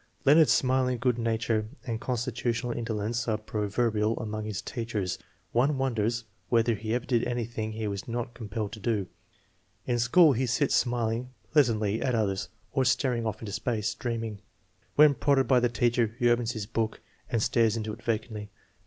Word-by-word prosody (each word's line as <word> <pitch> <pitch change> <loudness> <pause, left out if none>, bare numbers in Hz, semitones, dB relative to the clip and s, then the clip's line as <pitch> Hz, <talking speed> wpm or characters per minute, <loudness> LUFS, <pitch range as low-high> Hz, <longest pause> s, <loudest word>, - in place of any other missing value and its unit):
Leonard's 150 +2 +6
smiling 130 -1 +2
good 125 0 +1
nature 115 -1 0 0.2
and 115 -2 -3
constitutional 120 -1 -1
indolence 115 0 -2
are 110 -2 +1
proverbial 110 +1 0
among 110 -2 -4
his 105 -3 -3
teachers. 115 -6 -3 0.3
One 135 +4 +2
wonders 120 -3 0 0.3
whether 115 0 +3
he 110 +2 -2
ever 125 - -2
did 120 -2 +1
anything 115 -2 -3
he 110 0 -3
was 100 -2 -4
not 120 0 -3
compelled 110 -3 -4
to 110 - -8
do. 105 -2 0 0.8
In 120 -1 0
school 145 +7 +6
he 130 +2 0
sits 135 +4 +1
smiling 120 0 0 0.2
pleas 145 -5 +6
antly 110 -1 0
at 130 -3 +1
others 100 -4 0 0.2
or 135 -1 +2
staring 125 -2 +1
off 110 0 -4
into 105 - -5
space, 110 0 -1
dreaming. 115 -4 -4 0.5
When 150 -1 +7
prodded 135 0 +2
by 130 0 +5
the 120 0 +2
teacher 120 -1 +1
he 120 -2 +3
opens 120 -1 +1
his 110 -3 -4
book 110 +1 -2 0.3
and 115 - +1
stares 115 -2 +2
into 110 -1 -3
it 120 - -10
vacantly. 110 -2 -3
115 Hz, 170 wpm, -28 LUFS, 110-125 Hz, 0.8 s, When